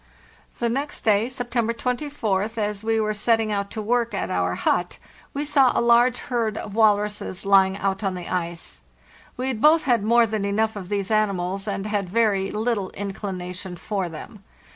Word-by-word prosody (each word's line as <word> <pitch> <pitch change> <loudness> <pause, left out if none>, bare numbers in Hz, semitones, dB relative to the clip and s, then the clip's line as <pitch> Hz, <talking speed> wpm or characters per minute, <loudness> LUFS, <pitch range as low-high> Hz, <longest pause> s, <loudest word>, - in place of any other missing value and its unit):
The 235 - 0
next 275 +5 -3
day 215 +2 +2
(September 240 -2 -1
24th), 230 -5 -2
as 210 -1 -2
we 225 0 +1
were 215 -1 0
setting 220 +1 +1
out 200 -1 -1
to 220 - -5
work 235 0 0
at - - -2
our 90 0 0
but, 175 0 +1 0.3
we 290 +1 -3
saw 275 -4 +4
a - - +4
large 235 +1 +4
herd 230 -5 -1
of 205 - -6
walruses 210 -3 +1
lying 195 -1 +4
out 195 0 -1
on 190 -2 -1
the 180 -1 -6
ice. 170 - -4 0.6
We 255 +1 -2
had 230 -4 -3
both 315 +2 +6
had 240 -6 +2
more 235 +2 +5
than 215 -2 -2
enough 215 +2 0
of 190 -3 -7
these 200 0 -2
animals, 195 -2 0
and 195 -1 -3
had 205 -3 -2
very 200 -2 +2
little 215 -3 -1
inclination 190 -2 -5
for 190 0 -3
them. 190 +6 -10
210 Hz, 180 wpm, -24 LUFS, 195-230 Hz, 0.6 s, both